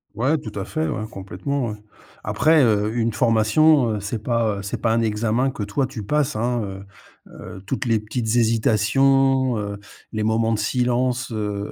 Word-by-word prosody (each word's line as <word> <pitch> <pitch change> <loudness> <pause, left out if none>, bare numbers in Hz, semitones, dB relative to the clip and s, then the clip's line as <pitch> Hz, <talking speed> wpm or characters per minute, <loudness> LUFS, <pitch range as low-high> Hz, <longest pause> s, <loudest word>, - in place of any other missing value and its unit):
Ouais, 135 +8 +1
tout - - -8
à - - -4
fait, 155 0 -2
ouais, 110 - -3
complètement, 105 +8 -4
ouais. 105 - -5 0.5
Après, 155 -2 +3
heu, 105 -2 +2
une 115 -1 0
formation, 120 +3 +3
heu, 105 - -2
c'est 105 +3 -4
pas, 115 -4 0
heu, - - -5
c'est 100 - -5
pas 115 - +2
un 115 0 +2
examen 115 +4 0
que 115 - -7
toi, 105 +7 -1
tu 110 - -7
passes, 150 +3 0
hein, 120 +1 0
heu 95 0 -7 0.5
heu, 95 +1 -10
toutes 130 +1 -2
les 115 -2 +2
petites 110 +2 -4
hésitations, 125 +4 +3
heu, 100 0 -5 0.3
les 110 -1 -2
moments 110 +1 +1
de - - 0
silence, 125 +2 0
heu 105 -2 -3
115 Hz, 185 wpm, -22 LUFS, 105-130 Hz, 0.5 s, Après